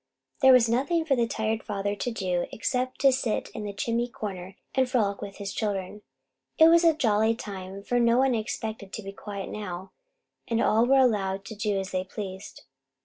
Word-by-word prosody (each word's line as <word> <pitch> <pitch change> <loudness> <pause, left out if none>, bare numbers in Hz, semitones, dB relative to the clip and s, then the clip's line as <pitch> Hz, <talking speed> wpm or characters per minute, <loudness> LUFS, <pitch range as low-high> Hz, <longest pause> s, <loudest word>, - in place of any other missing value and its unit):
There 265 -1 +8
was 250 -2 +6
nothing 285 +8 +1
for 280 -4 +2
the 235 -2 +1
tired 220 0 -1
father 205 0 -2
to 245 - -3
do 185 -6 -1
except 255 +3 -2
to 275 -1 +6
sit 250 -4 -1
in 215 - -6
the 205 - -3
chimney 230 +4 -1
corner 195 -5 -7 0.2
and 260 -1 +2
frolic 210 -6 0
with 200 -1 -7
his 200 -1 -5
children. 205 -1 -3 0.6
It 320 +1 +8
was 335 +1 +6
a 330 -2 +5
jolly 225 -5 +2
time, 195 -3 -7
for 245 +3 0
no 235 0 +4
one 265 +1 +4
was 230 -3 +1
expected 215 -2 -5
to 220 - -5
be 195 - -6
quiet 200 -1 -7
now, 190 -3 -6 0.6
and 230 -1 0
all 230 +1 +3
were 270 +1 +5
allowed 200 -6 +2
to 220 - -8
do 205 -1 -1
as 190 0 -5
they 185 0 -1
pleased. 190 0 -8
215 Hz, 200 wpm, -27 LUFS, 195-245 Hz, 0.6 s, There